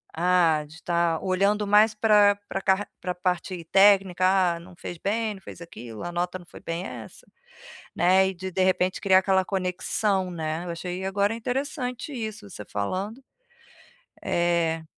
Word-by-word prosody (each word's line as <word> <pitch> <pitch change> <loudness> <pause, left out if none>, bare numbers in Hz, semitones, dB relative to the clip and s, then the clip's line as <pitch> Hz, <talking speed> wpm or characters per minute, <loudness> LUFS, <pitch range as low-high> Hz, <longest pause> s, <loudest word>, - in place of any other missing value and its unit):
Ah, 170 -2 +3
de 150 - -15
estar 170 -1 0
olhando 200 +3 +1
mais 210 +2 +4
pra 210 -2 +5
pra 195 - -3
carr 190 +2 +1
pra 180 0 -3
parte 180 0 -2
técnica, 195 0 +4 0.3
ah - - -8
não 175 +1 -14
fez 175 - -7
bem, 215 +3 -1
não 195 - -13
fez 170 - -11
aquilo, 120 -10 -9
a 175 - -4
nota 175 +1 -2
não 175 - -15
foi - - -13
bem 170 +2 -4
essa, 115 - -9 0.7
né, 190 +2 +4
e - - -5
de 190 +1 -6
de 185 +1 +1
repente 185 0 +1
criar 190 -1 +5
aquela 190 0 +2
conexão 190 0 -1
né, 160 0 -3
eu 175 - -4
achei 180 +2 -5
agora 200 +3 0
interessante 250 +2 -3
isso 220 -5 -6
você 105 - -9
falando, 190 - -4 1.0
eh. 170 -2 0
185 Hz, 165 wpm, -25 LUFS, 175-205 Hz, 1.0 s, pra